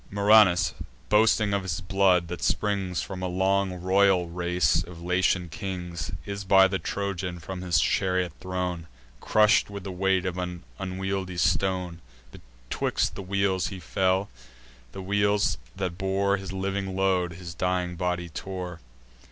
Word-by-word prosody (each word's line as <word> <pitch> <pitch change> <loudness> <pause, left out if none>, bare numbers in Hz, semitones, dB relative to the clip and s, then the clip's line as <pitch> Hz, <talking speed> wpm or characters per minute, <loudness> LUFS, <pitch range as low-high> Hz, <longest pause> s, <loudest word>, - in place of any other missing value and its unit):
Murranus, 100 -6 +5 0.4
boasting 105 -1 +4
of 100 - +1
his 90 -4 -3
blood, 90 -1 +2
that 85 -3 -5
springs 100 -4 0
From 95 -2 -7
a 95 - -1
long 95 +1 +1
royal 95 -1 +3
race 90 -1 +1
of 85 0 -11
Latian 90 0 +1
kings, 90 -3 -5 0.2
Is 100 0 -5
by 95 0 +6
the 95 0 -2
Trojan 95 -3 -3
from 90 +3 -7
his 85 -3 +2
chariot 90 -4 +1
thrown, 90 -2 -3 0.3
Crush'd 105 - +3
with 100 -2 -7
the 95 - -5
weight 95 0 +1
of 90 0 -2
an 90 -1 -5 0.2
unwieldy 95 -1 -3
stone: 90 0 0 0.3
Betwixt - - -3
the - - -6
wheels 95 -1 0
he 95 - -7
fell; 95 +7 0 0.6
the 95 - -7
wheels, 100 -3 +1 0.2
that 95 -2 -4
bore 100 +1 +1
His 95 -1 -7
living 95 0 -3
load, 95 -2 +1
his 85 0 -8
dying 90 -1 -1
body 90 0 -2
tore. 90 0 -6
95 Hz, 145 wpm, -26 LUFS, 90-95 Hz, 0.6 s, by